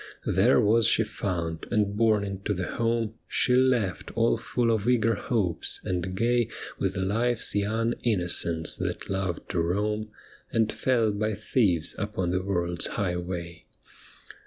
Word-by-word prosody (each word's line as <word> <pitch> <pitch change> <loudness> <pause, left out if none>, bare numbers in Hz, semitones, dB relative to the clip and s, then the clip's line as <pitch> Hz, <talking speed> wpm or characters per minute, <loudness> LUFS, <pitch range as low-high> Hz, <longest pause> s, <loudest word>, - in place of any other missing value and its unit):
There - - +4
was 110 +1 +4
she 110 - +4
found, 85 -6 -4
and 105 -3 +1
borne 110 -2 +3
into 100 +1 -3
the 90 0 -2
home 115 0 -1
She 125 - +2
left 125 -10 +2
all 115 0 +3
full 120 -2 0
of 110 +1 +1
eager 115 -2 +3
hopes, 95 -11 -2
and 90 0 -2
gay 120 +1 +2 0.3
With 95 0 -1
life's 115 +5 +1
young 110 +3 0
innocence 85 -6 +1
that - - -4
loved 95 -3 -2
to 90 -4 0
roam. 105 +5 -1 0.4
And 110 -1 +2
fell 115 -4 +1
by 105 +1 -1
thieves 90 -7 +1
upon 100 -4 -2
the 90 +1 0
world's 85 -3 -1
highway. 90 -3 -4
105 Hz, 140 wpm, -27 LUFS, 90-115 Hz, 0.4 s, There